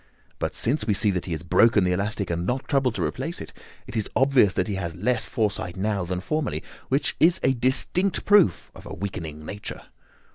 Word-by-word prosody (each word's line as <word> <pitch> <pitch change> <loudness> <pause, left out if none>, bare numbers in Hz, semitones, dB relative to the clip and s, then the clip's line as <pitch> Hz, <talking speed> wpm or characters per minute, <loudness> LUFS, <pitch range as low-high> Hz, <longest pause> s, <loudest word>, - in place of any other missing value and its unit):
But - - -2
since 120 -1 0
we 105 - +2
see 105 +1 +3
that 90 -2 -3
he 90 - -6
has 80 0 -3
broken 110 +4 +4
the 90 - +1
elastic 100 +1 -2
and 85 - -1
has 85 - -3
not 130 +2 -2
troubled 135 -5 +1
to - - -1
replace - - -2
it, - - -9 0.3
it - - -10
is 110 -2 -1
obvious 130 -7 +4
that - - 0
he 105 - -2
has 85 -4 -4
less 115 +6 0
foresight 100 -5 -2
now 100 -1 -1
than 90 0 -3
formerly, 155 +9 -2 0.3
which 135 +3 +1
is 170 +3 +4
a 130 - +4
distinct 135 +9 0
proof 205 -3 +4
of - - -12
a - - -7
weakening 80 -5 -6
nature. 100 +4 -7
105 Hz, 215 wpm, -25 LUFS, 90-130 Hz, 0.3 s, broken